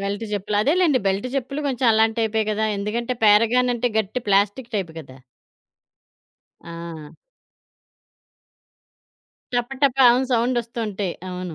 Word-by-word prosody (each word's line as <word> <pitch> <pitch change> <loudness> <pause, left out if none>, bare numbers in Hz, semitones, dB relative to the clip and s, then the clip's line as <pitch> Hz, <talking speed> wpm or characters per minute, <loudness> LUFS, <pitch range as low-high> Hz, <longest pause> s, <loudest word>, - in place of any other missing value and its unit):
Belt 200 +2 -3
చెప్పులు. 205 +1 -2
అదేలెండి. 310 -1 +3
Belt 195 +4 0
చేప్పులు 275 +2 -3
కొంచెం 255 -1 -1
అలాంటి 220 +1 +2
టైపే 220 0 0
కదా! 220 +1 0
ఎందుకంటే. 230 +5 -3
పేరగానంటే, 240 +3 +3
గట్టి 220 +4 -2
ప్లాస్టిక్ 205 +5 +1
టైపు 180 -5 -3
గదా! 135 -3 -14 1.4
ఆ! 170 -2 -9 2.4
టప, 245 0 0
టపాను 255 -2 +5
సౌండొస్తూంటాయి. 230 -5 -1 0.2
అవును. 180 -2 -6
220 Hz, 105 wpm, -22 LUFS, 200-245 Hz, 2.4 s, టపాను